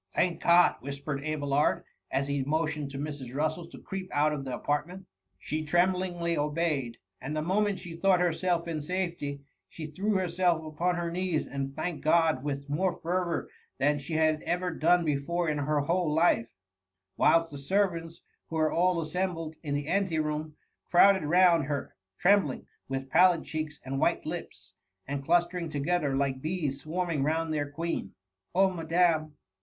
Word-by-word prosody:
". - - -41
Thank 175 -1 +1
God 175 +1 +6
T - - -13
whispered 140 0 -4
Abelard, 145 -1 +1 0.3
as 135 +1 0
he; 140 -1 0
motioned 150 0 -1
to 140 - -7
Mrs. 140 -3 -5
Russel 155 +3 -1
to 175 - -12
creep 190 -1 -6
out 150 +1 +2
of 140 -2 -4
the 130 - -3
apartment 170 +6 -2 0.3
She 155 +10 -3
tremblingly 175 +1 +1
obeyed; 150 -5 -1 0.2
and 145 +4 -4
the 155 - -1
moment 200 +3 +1
she 170 -2 -8
.thought 185 +1 +3
herself 175 0 0
in 160 -2 -3
safety, 170 -4 -3 0.3
she 160 - -7
threw 195 +8 -1
herself 175 -3 +1
upon 170 +4 -1
her 170 -1 -2
knees, 180 -2 -1
and 135 0 -4
thanked 175 -3 -4
God 160 -4 +3
with 140 -1 -3
more 175 +5 0
fervour 175 0 -1 0.3
than 145 +1 +2
she 140 +3 -7
had 155 -1 +2
ever 180 +1 -1
done 170 +2 +3
before 160 +4 0
in 150 -1 0
her 145 +1 +1
whole 170 +2 0
life; 160 -7 +3 0.7
whilst 165 0 +3
the 145 - -7
servants, 170 +1 -1 0.2
who 165 - -6
were 155 -1 +2
all 180 0 +2
assembled 165 0 -2
in 145 -3 -2
the 145 0 -3
ante 190 -2 +1
room, 155 0 -2 0.3
crowded 190 -2 +5
round 170 -2 +5
her, 140 -2 -4 0.2
trembling, 190 -7 +3 0.2
with 135 0 -4
pallid 180 -3 +5
cheeks, 155 -2 -5
and 135 +1 -3
white - - +1
lips, - - -7 0.3
and 140 0 -3
clustering 175 +1 +1
together 145 -1 0
like 135 -1 -1
bees 155 -4 -2
swarming 165 -2 -2
round 160 +2 0
their 145 -1 -1
queen. 165 +3 -3
^^ 95 - -14 0.4
Oh, 190 +1 +4
madam! 165 -2 +1
160 Hz, 170 wpm, -29 LUFS, 145-175 Hz, 0.7 s, God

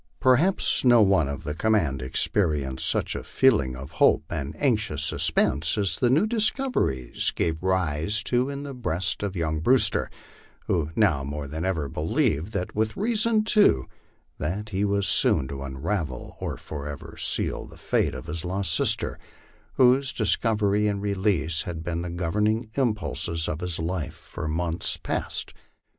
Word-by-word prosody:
Perhaps 135 +10 +4
no 120 -2 +6
one 95 -7 +3
of 70 +3 -5
the 75 -1 -3
command 80 -8 +1
experienced 70 0 0
such - - 0
a - - -4
feeling 105 - +2
of 65 +1 -9
hope - - +5
and 70 +3 -4
anxious 110 - 0
suspense 75 - +1
as 100 -6 0
the 125 - +3
new 145 - +4
discoveries 220 - 0
gave 80 -1 -1
rise 95 +1 0
to 125 +2 +1
in 140 0 -5
the 140 -1 -6
breast 95 -8 -2
of 100 -2 -3
young 80 -3 -1
Brewster, 125 +11 +4 0.6
who 80 -4 0
now 90 -11 +2
more 70 +1 -5
than 80 +4 -5
ever 85 -6 -1
believed, 90 - -1
and 90 -2 -2
with 110 0 -1
reason 220 +1 +1
too, 205 - +4 0.5
that 95 +7 -3
he 100 0 -1
was 100 -1 +1
soon 65 - +3
to 70 -1 -6
unravel 70 +1 -4
or - - -4
forever 75 -1 -7
seal - - -1
the - - -15
fate - - 0
of - - -7
his 80 +2 -3
lost 95 -2 -1
sister, - - 0 0.5
whose 130 +2 +4
dis 110 -4 +2
covery 105 -2 +1
and 100 -1 -3
release 95 -5 0
had 85 -5 -6
been 85 0 -3
the 90 - -4
governing 105 +6 -1
impulses 105 -9 -1
of 75 - -3
his 90 -2 +1
life 80 -1 -3
for 75 - -7
months 85 +2 -1
past. - - -3
95 Hz, 160 wpm, -25 LUFS, 75-110 Hz, 0.6 s, no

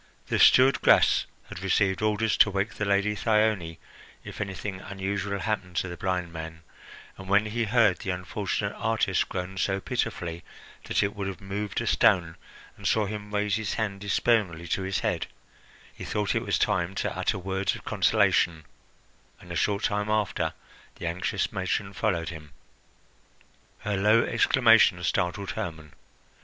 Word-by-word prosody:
The - - +1
steward 130 +2 +6
Gras - - +5 0.2
had 90 - -8
received 95 0 +1
orders 110 +1 +1
to - - +6
wake 100 0 -2
the 105 - -3
Lady 100 +1 +2
Thyone 105 -7 +1 0.5
if - - -8
anything 95 0 -5
unusual 100 0 -3
happened 95 -5 -3
to 95 - 0
the 85 - -6
blind 90 -3 -2
man, 80 0 -8 0.6
and 95 0 -9
when 100 +2 +4
he 115 +2 -1
heard 110 -3 +3
the - - -5
unfortunate 90 -2 -2
artist 110 -4 0
groan 95 +1 -5
so 95 0 0
pitifully 90 -6 -3 0.4
that - - +1
it 100 0 -2
would 100 -2 -3
have 95 -2 -6
moved 100 +1 -4
a - - -3
stone, 85 -3 +3 0.4
and 100 - -4
saw 110 +3 +2
him 105 0 -6
raise 105 0 0
his 110 -3 -3
hand 100 -3 -3
despairingly 100 -5 +1
to 95 - 0
his 95 0 -2
head, - - -1 0.7
he - - -10
thought 105 -1 -1
it - - 0
was - - 0
time 90 +1 0
to - - -2
utter - - 0
words 95 +1 -1
of - - -12
consolation, 80 -3 +2 0.7
and 90 - -13
a - - -4
short 100 +3 0
time 105 0 0
after 105 -2 0 0.4
the - - -7
anxious 95 +4 -1
matron 95 0 -2
followed 90 -6 -1
him. 75 -3 -10 1.3
Her 105 -1 -2
low 105 +4 +4
exclamation 115 -6 +4
startled 90 +3 -1
Hermon. 80 -4 -6
100 Hz, 160 wpm, -27 LUFS, 90-105 Hz, 1.3 s, steward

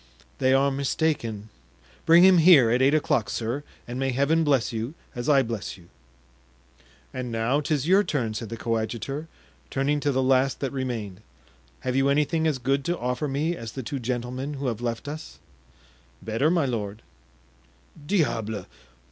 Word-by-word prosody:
"They 130 - +3
are 135 +1 +3
mistaken; 135 -6 -1 0.6
bring 170 +2 +8
him 185 -2 +7
here 155 -9 +7
at 125 +2 +2
eight 140 +3 +4
o'clock, 145 -7 +1
sir, 120 +5 -3 0.2
and 120 +1 -5
may 135 0 0
Heaven 140 +6 +2
bless 135 -7 +1
you 115 +7 -4 0.2
as 120 +3 -3
I 140 -2 +5
bless 115 -4 -5
you!" 85 -2 -19 1.2
"And 125 -2 -4
now 115 +6 +1
'tis 150 -1 -1
your 195 +3 +5
turn," 125 - -2
said 110 0 -5
the 115 - -5
coadjutor, 115 +6 -3 0.4
turning 140 +2 0
to 145 0 0
the 130 0 +1
last 130 +1 +2
that 135 -3 -2
remained; 115 -7 -4 0.6
"have 125 - -2
you 135 +1 +3
anything 150 +3 +2
as 150 -4 0
good 135 +2 0
to 175 0 0
offer 125 +4 -2
me 150 +5 -1
as 115 -7 -8
the 130 - -5
two 140 +4 -4
gentlemen 125 +3 -3
who 140 0 -5
have 120 -3 -2
left 120 +2 -3
us?" 155 +2 -7 0.9
"Better, 115 +7 +1
my 170 -3 +2
lord." 110 -4 -4 1.0
"Diable! 110 - 0
130 Hz, 165 wpm, -25 LUFS, 115-145 Hz, 1.2 s, bring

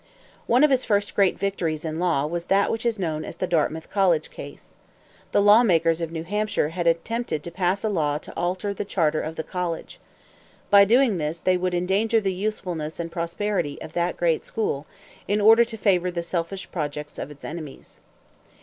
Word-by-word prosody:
One 245 +4 +4
of 300 - +5
his 260 -1 +3
first 205 -2 0
great 195 -3 +3
victories 170 -6 -2
in 160 0 -3
law 170 -6 +1
was 170 +2 -3
that 195 +2 +2
which 225 +1 -1
is 230 -2 0
known 160 -5 -2
as - - -7
the - - -2
Dartmouth 160 -2 -1
College 180 -6 +2
case. - - -11 0.6
The 205 - +3
lawmakers 175 -7 +5
of 165 -1 -3
New 165 -1 -4
Hampshire 210 -4 -1
had 170 +1 -2
attempted 170 0 -1
to 170 - -6
pass 185 +2 0
a - - +1
law 155 -8 0
to - - -10
alter 185 +3 -2
the - - -4
charter 160 -6 0
of 160 +1 -5
the 160 - -3
college. 175 0 -4 0.7
By 200 0 +8
doing 235 -3 +3
this 155 +2 -3
they 185 +2 +2
would 180 0 -1
endanger 200 +6 +2
the 195 -3 -1
usefulness 180 -6 -3
and 170 0 -4
prosperity 170 -2 -2
of 155 - -9
that 175 +1 -1
great 165 -2 +1
school, 150 -10 -3 0.4
in 205 +2 +1
order 225 +3 +7
to 225 -1 -8
favor 185 -4 +2
the 175 -1 -3
selfish 170 +2 -4
projects 150 -2 -5
of - - -5
its 145 -1 -12
enemies. 155 -4 -9
180 Hz, 195 wpm, -24 LUFS, 160-205 Hz, 0.7 s, By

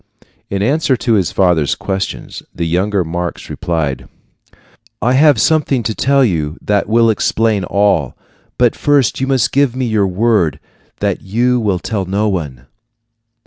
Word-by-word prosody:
In 100 0 -2
answer 140 +2 +1
to 115 0 0
his 95 -5 +1
father's 85 -6 +2
questions, 95 0 -4
the 85 - -2
younger 95 +4 0
Marx 85 +1 -5
replied: 80 -6 -3 0.9
"I 125 +1 +1
have 145 -2 +4
something 140 -1 +1
to 110 - -2
tell 135 +3 +2
you 80 -6 -2
that 100 0 -1
will 115 0 +4
explain 110 -1 0
all; 100 +1 +1 0.4
but 120 -2 +2
first 145 -5 +1
you 135 - 0
must 130 -5 +1
give 140 -3 +1
me 130 0 -1
your 110 -4 +1
word 95 -5 +1 0.4
that - - -1
you 120 +5 0
will 105 -5 0
tell 100 +1 -3
no 100 +4 -1
one." 75 -10 -4
105 Hz, 150 wpm, -15 LUFS, 90-125 Hz, 0.9 s, have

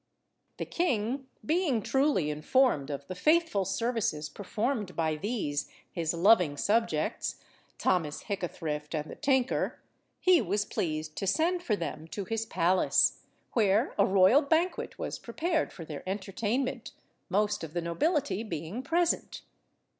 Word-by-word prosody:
The - - -3
king, 260 -5 -1 0.2
being 305 - +1
truly 265 - +2
informed 150 - +2
of 140 -1 -5
the 185 - -5
faithful 305 - +2
services 195 -7 -1
performed 210 - -2
by 160 -2 0
these 155 -6 -2 0.2
his 165 -2 -1
loving 175 -4 +4
subjects, 225 +8 0 0.4
Thomas 160 -5 0
Hickathrift 160 -6 -4
and 150 0 -3
the - - -7
tinker, 265 -2 +1 0.4
he 365 -3 +5
was 205 +1 0
pleased 155 -4 -3
to 195 - -2
send 340 - +2
for 225 -11 0
them 165 -3 -5
to 200 +4 -5
his 225 +3 -2
palace, 180 -2 +3 0.3
where 215 +1 +3
a 200 - +6
royal 195 +8 +6
banquet 325 +5 0
was - - -4
prepared 325 -1 -1
for 165 - -9
their 150 -2 -6
entertainment, 225 +6 -2 0.4
most 205 0 +1
of 160 -1 -7
the 175 - -1
nobility 285 - 0
being 175 +1 -5
present. 335 +5 0
205 Hz, 135 wpm, -29 LUFS, 165-265 Hz, 0.4 s, a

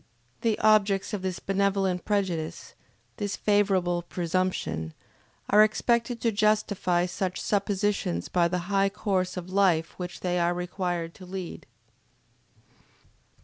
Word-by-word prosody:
The 225 -2 +1
objects 210 -1 +3
of 205 - -2
this 185 -1 -2
benevolent 195 -2 0
prejudice, 185 -6 -2 0.4
this 205 -3 -2
favorable 195 -4 +2
presumption, 175 - -2 0.6
are 210 +1 +8
expected 235 +2 +1
to 230 - +2
justify 205 -4 +1
such 185 +1 -3
suppositions 200 - 0
by 175 -1 +2
the 180 0 -2
high 195 0 +3
course 185 -2 -1
of 180 +1 -6
life 180 -5 +3
which 180 -1 -6
they 180 -1 0
are 175 0 +1
required 175 -2 -3
to 185 - -12
lead. 185 -1 -7
190 Hz, 120 wpm, -27 LUFS, 175-205 Hz, 0.6 s, are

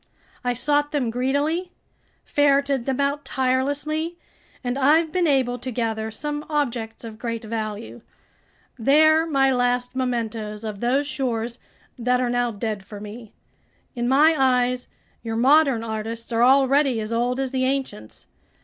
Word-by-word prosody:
I 245 -1 0
sought 290 +3 +1
them 260 -6 0
greedily, 285 +9 -1 0.5
ferreted 280 -3 +2
them 265 0 -1
out 280 +1 0
tirelessly, 285 +6 -1 0.5
and 245 0 -1
I've 305 +4 +3
been 355 0 +1
able 255 -4 +1
to 255 - -5
gather 220 -2 -2
some 295 +5 -4
objects 240 -8 -2
of 225 -1 -9
great 230 -2 -4
value. 220 -1 -5 0.8
They're 310 +6 +4
my 270 -3 +3
last 245 0 0
mementos 225 -4 -3
of 210 -2 -5
those 260 +5 +1
shores 245 -4 -2 0.4
that 250 +1 +2
are 250 -1 0
now 245 0 +1
dead 215 -2 -4
for 205 +1 -10
me. 215 +2 -9 0.6
In 240 -2 -2
my 305 +5 +5
eyes, 250 -2 +1 0.3
your 225 -1 -4
modern 270 0 +4
artists 225 +1 -5
are 230 0 +1
already 270 0 +4
as 215 +1 -4
old 245 +2 0
as 265 -1 -2
the 260 -1 0
ancients. 260 - -4
250 Hz, 145 wpm, -23 LUFS, 230-280 Hz, 0.8 s, my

